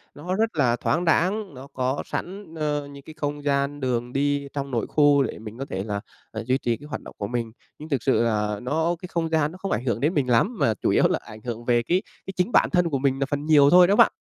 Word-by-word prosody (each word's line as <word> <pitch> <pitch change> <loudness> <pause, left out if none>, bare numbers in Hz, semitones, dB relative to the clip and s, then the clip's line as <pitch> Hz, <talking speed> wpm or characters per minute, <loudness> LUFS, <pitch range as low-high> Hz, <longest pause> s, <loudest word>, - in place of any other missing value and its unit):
Nó 175 +5 -3
rất 220 -2 0
là 125 -5 +3
thoáng 170 +7 0
đãng, 190 +4 +1
nó 130 +1 -10
có 130 +2 -1
sẵn, 185 -2 -6
ờ, 150 -2 -2
những 140 -1 -12
cái 155 - -11
không 145 -1 -3
gian 140 0 0
đường 125 -2 -2
đi 145 0 0
trong 140 -1 -4
nội 120 -2 -1
khu 145 -2 +4
để 130 - -5
mình 110 +1 -9
có 135 - -4
thể 95 -7 -4
là, 100 -1 -3 0.3
à, 110 - -4
duy 130 +2 +2
trì 120 -3 -1
cái 145 - -13
hoạt - - -5
động - - -12
của 100 - -3
mình. 115 0 -3 0.3
Nhưng 155 +1 -9
thực 140 -5 -1
sự 130 -3 +3
là 105 -2 0
nó 160 +7 0
cái 180 - -6
không 165 -1 -1
gian 155 -2 +1
nó 180 - -11
không 195 +1 -4
ảnh 125 - -1
hưởng 115 -4 0
đến 150 +7 +1
mình 140 -6 0
lắm, 195 - +2
mà 110 - +3
chủ 100 - -2
yếu - - +4
là - - 0
ảnh 110 0 -12
hưởng 120 0 -6
về 120 -1 +2
cái 180 +9 +1 0.2
cái 195 - -6
chính 180 +5 0
bản - - +4
thân 180 -2 +2
của 140 - 0
mình 135 0 +1
là 135 - +1
phần 145 +1 -3
nhiều 145 -3 +6
thôi 180 +2 +7
đó 200 - +3
bạn. - - +6
140 Hz, 280 wpm, -24 LUFS, 120-160 Hz, 0.3 s, thôi